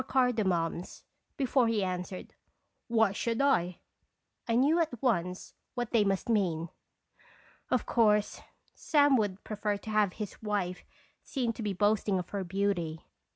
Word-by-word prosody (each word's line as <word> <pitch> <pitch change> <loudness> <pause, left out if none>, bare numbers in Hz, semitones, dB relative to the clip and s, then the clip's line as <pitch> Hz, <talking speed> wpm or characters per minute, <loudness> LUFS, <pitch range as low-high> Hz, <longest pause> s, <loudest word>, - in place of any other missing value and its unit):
cardamoms, 190 -10 0 0.3
before 260 -2 +2
he 220 -3 +1
answered, 180 0 -4 0.5
"Why 225 -3 +3
should 230 +3 -2
I 185 -11 +2 0.3
?" - - -50
I 230 - +2
knew 290 +7 +4
at 305 -8 -1
once 180 -8 -1 0.2
what 245 -2 -3
they 230 -3 +4
must 195 -2 0
mean. 175 -7 +1 1.0
Of 250 - +1
course, 210 -3 +2 0.3
Sam 290 -3 +3
would 205 -3 -1
prefer 210 -1 -2
to 215 - -8
have 210 -3 +2
his 210 -3 -7
wife 200 -4 -2 0.4
seen 245 -4 -2
to 215 -3 -3
boasting 205 0 +2
of 180 - -4
her 200 -1 -2
beauty. 180 -4 -2
210 Hz, 140 wpm, -30 LUFS, 185-235 Hz, 1.0 s, knew